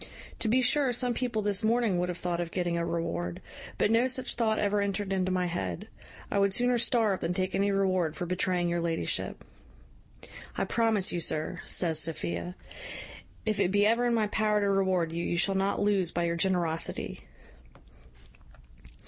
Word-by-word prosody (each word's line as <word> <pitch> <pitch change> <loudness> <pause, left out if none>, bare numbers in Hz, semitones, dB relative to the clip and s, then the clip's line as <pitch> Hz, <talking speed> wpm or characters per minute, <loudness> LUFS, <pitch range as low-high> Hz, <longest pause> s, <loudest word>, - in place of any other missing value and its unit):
To - - 0
be 255 +4 +3
sure 270 +1 +3
some 245 0 +1
people 235 -3 -1
this 205 -1 +1
morning 220 -4 +2
would 180 0 -1
have 180 - -3
thought 175 -1 -2
of 170 - -3
getting 175 -1 -1
a 170 - 0
reward; 90 - -3 0.4
but 210 - +2
no 230 +3 +4
such 255 0 -1
thought 220 -2 +1
ever 205 0 +1
entered 200 0 -1
into 185 -1 0
my 185 -1 +1
head. 95 - -4 0.4
I 200 - +2
would 200 -1 +3
sooner 245 0 +2
starve 225 -5 +2
than 170 +2 -2
take 185 0 -1
any 200 +1 +2
reward 185 -5 +1
for 175 - -3
betraying 180 0 0
your 170 0 0
ladyship." 165 - -2 1.1
"I - - +1
promise 225 -4 +1
you, 175 - -1
sir," 155 -2 -2
says 165 -3 +1
Sophia, 90 - -2 0.9
"if 215 -2 0
it 180 - +3
be 205 +1 +3
ever 230 +3 +3
in 235 - +2
my 220 -2 +2
power 210 0 +1
to 200 - +1
reward 185 -4 +1
you, 170 +1 -3
you 175 - -1
shall 195 +3 +2
not 195 +1 0
lose 200 -4 +2
by 175 0 -1
your 170 0 0
generosity." 170 - -1
190 Hz, 180 wpm, -29 LUFS, 170-215 Hz, 1.1 s, no